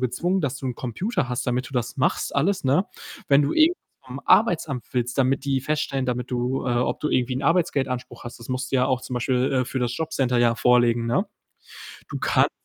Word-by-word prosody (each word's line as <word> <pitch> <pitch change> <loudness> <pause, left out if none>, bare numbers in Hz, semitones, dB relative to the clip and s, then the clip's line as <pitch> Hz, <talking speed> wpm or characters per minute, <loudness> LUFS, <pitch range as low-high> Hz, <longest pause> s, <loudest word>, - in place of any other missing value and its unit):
gezwungen, 170 +10 0
dass 135 -2 -1
du 130 - -6
'n 125 - -2
Computer 170 - -2
hast, 125 0 -3
damit 125 +1 -1
du - - -12
das 120 -1 -2
machst 130 - 0
alles, 180 +4 +1
ne? 145 +9 +3 0.4
Wenn 140 +1 +5
du 140 - 0
irgendwas 325 +3 +4 0.3
vom 130 +2 -7
Arbeitsamt 155 - +3
willst, 125 -1 -1
damit 135 +1 +2
die 135 -1 0
feststellen 140 -2 -1
damit 125 0 -3
du, 125 +1 -1
äh 125 - +1
ob 125 - 0
du 150 - -1
irgendwie 125 -1 0
'n 135 - -4
Arbeitsgeldanspruch 140 -6 0
hast, 120 - -8
das 115 - -12
musst 130 0 -3
du 135 - +3
ja 125 - +3
auch 130 -2 0
zum 125 - -6
Beispiel, 125 +1 0
äh, 130 -1 +2
für 130 +1 -4
das 120 0 -1
Jobcenter 135 -6 0
ja 120 -1 +3
vorlegen, 120 -1 +3
ne? 185 - +1 0.8
Du - - -5
kannst - - +3
130 Hz, 220 wpm, -24 LUFS, 125-140 Hz, 0.8 s, Wenn